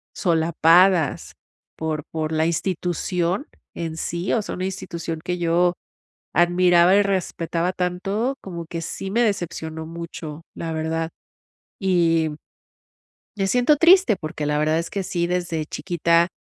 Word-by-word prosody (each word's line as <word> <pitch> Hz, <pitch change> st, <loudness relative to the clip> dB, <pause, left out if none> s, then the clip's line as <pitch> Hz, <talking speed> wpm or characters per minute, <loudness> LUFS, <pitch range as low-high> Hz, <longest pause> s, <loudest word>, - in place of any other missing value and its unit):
solapadas, 170 Hz, -1 st, +3 dB, 0.4 s
por 155 Hz, -2 st, -2 dB
por 155 Hz, -1 st, -2 dB
la 160 Hz, 0 st, +1 dB
institución 180 Hz, -, -1 dB, 0.3 s
en 165 Hz, -1 st, -4 dB
sí. 170 Hz, +3 st, -2 dB
O 230 Hz, -, +2 dB
sea, -, -, -5 dB
una 185 Hz, -, -4 dB
institución 170 Hz, -4 st, -5 dB
que 180 Hz, 0 st, -2 dB
yo 175 Hz, +1 st, +2 dB, 0.6 s
admiraba 175 Hz, +1 st, +5 dB
y 205 Hz, -, +6 dB
respetaba 180 Hz, -3 st, -1 dB
tanto, 195 Hz, +8 st, -1 dB
como 170 Hz, -3 st, -7 dB
que 165 Hz, 0 st, -5 dB
sí, 190 Hz, +3 st, -5 dB
me 235 Hz, +4 st, +2 dB
decepcionó 160 Hz, -6 st, -2 dB
mucho, 165 Hz, -2 st, -7 dB
la 165 Hz, -, -4 dB
verdad. 160 Hz, +1 st, -2 dB, 0.7 s
Y 165 Hz, -4 st, +2 dB, 1.1 s
me 195 Hz, -1 st, 0 dB
siento 250 Hz, +6 st, +4 dB
triste, 340 Hz, -, +6 dB
porque 155 Hz, -1 st, -4 dB
la 150 Hz, 0 st, +1 dB
verdad 155 Hz, +1 st, +2 dB
es 170 Hz, -, -4 dB
que 200 Hz, -, -2 dB
sí, 170 Hz, -2 st, -1 dB
desde 175 Hz, -3 st, -1 dB
chiquita, 170 Hz, -1 st, +1 dB
170 Hz, 135 wpm, -23 LUFS, 165-185 Hz, 1.1 s, y